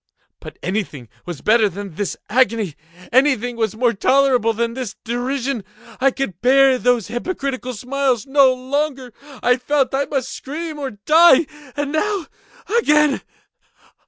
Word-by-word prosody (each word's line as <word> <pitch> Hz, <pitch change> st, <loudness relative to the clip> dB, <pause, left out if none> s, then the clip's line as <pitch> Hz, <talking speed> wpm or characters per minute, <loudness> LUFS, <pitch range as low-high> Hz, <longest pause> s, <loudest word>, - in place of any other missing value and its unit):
But -, -, -11 dB
anything 175 Hz, -, -4 dB, 0.2 s
was 175 Hz, -5 st, -6 dB
better 220 Hz, -1 st, +3 dB
than 195 Hz, 0 st, -8 dB
this 200 Hz, +4 st, -3 dB
agony! 225 Hz, -, +1 dB, 0.4 s
Anything 250 Hz, -2 st, +2 dB
was 220 Hz, -2 st, -1 dB
more 240 Hz, +1 st, +2 dB
tolerable 255 Hz, +1 st, +3 dB
than 230 Hz, +1 st, -2 dB
this 245 Hz, -5 st, -5 dB
derision! 245 Hz, 0 st, -2 dB, 0.4 s
I 270 Hz, +2 st, +4 dB
could 250 Hz, -9 st, -5 dB
bear 265 Hz, +1 st, +5 dB
those 245 Hz, -4 st, +1 dB
hypocritical 255 Hz, -2 st, -4 dB
smiles 255 Hz, 0 st, -1 dB
no 275 Hz, -1 st, +5 dB
longer! 260 Hz, 0 st, -3 dB, 0.3 s
I 250 Hz, 0 st, +4 dB
felt 270 Hz, +1 st, 0 dB
that 275 Hz, +1 st, -1 dB
I -, -, -24 dB
must 270 Hz, -2 st, -2 dB
scream 310 Hz, +2 st, -6 dB
or 275 Hz, -2 st, -3 dB
die! 310 Hz, +8 st, +5 dB, 0.3 s
and 290 Hz, -1 st, -2 dB
now—again! 315 Hz, -3 st, 0 dB
255 Hz, 135 wpm, -20 LUFS, 230-275 Hz, 0.4 s, bear